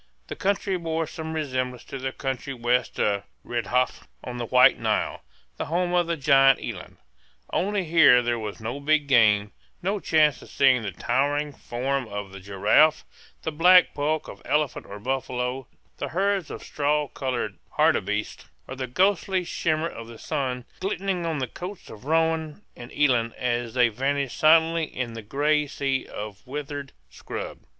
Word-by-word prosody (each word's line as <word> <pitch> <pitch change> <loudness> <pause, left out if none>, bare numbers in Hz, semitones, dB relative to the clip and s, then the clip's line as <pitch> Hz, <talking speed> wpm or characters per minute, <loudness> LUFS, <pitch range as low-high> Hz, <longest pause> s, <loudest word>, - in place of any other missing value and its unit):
The - - -4
country 195 -1 0
bore 165 -1 -1
some 160 0 -6
resemblance 130 -5 -2
to 135 - -7
the 130 0 -3
country 135 0 -4
west 120 +1 0
of 100 -1 +1 0.2
Redjaf 120 +2 -1 0.2
on 125 -1 -6
the 120 - -3
White 125 +2 +6
Nile, - - -1 0.4
the - - -3
home 175 +3 -1
of 175 -1 +2
the 170 -1 -1
giant 135 -2 +5
eland; - - -7 0.6
only 200 +1 0
here 160 -7 +6
there 120 -1 0
was 105 0 -6
no 115 +5 -4
big 150 +1 +2
game, 105 -5 +4 0.3
no 200 +3 0
chance 155 -6 +3
of - - -13
seeing 130 -3 +4
the 100 -3 -4
towering 145 - 0
form 130 +1 -3
of 100 -2 -6
the 100 - -9
giraffe, 100 +11 +3 0.4
the 160 - -2
black 180 +4 +6
bulk 150 +2 -1
of - - -10
elephant 150 -2 -1
or 100 - -8
buffalo, 130 +1 -3 0.3
the - - -3
herds 195 -1 0
of - - -7
straw 150 0 0
colored 130 -3 -3 0.2
hartebeests, 105 +2 +1 0.2
or 130 - -6
the 130 -1 -4
ghostly 190 +5 +1
shimmer 160 -1 -1
of 115 -7 -8
the 115 -1 -11
sun 125 0 -3
glinting 185 -2 -2
on 160 -2 -1
the 130 -2 -2
coats 180 - -8
of 110 +3 -12
roan 160 +2 0
and 120 0 -10
eland 120 -6 +2
as 120 -1 -2
they 125 -1 +5
vanished 135 +3 -2
silently 160 +1 +5
in 125 -5 -5
the 115 - -7
gray 150 +6 +1
sea 135 -1 -2
of 105 -1 -7
withered 145 0 -5 0.2
scrub. - - -7
135 Hz, 165 wpm, -25 LUFS, 120-160 Hz, 0.6 s, White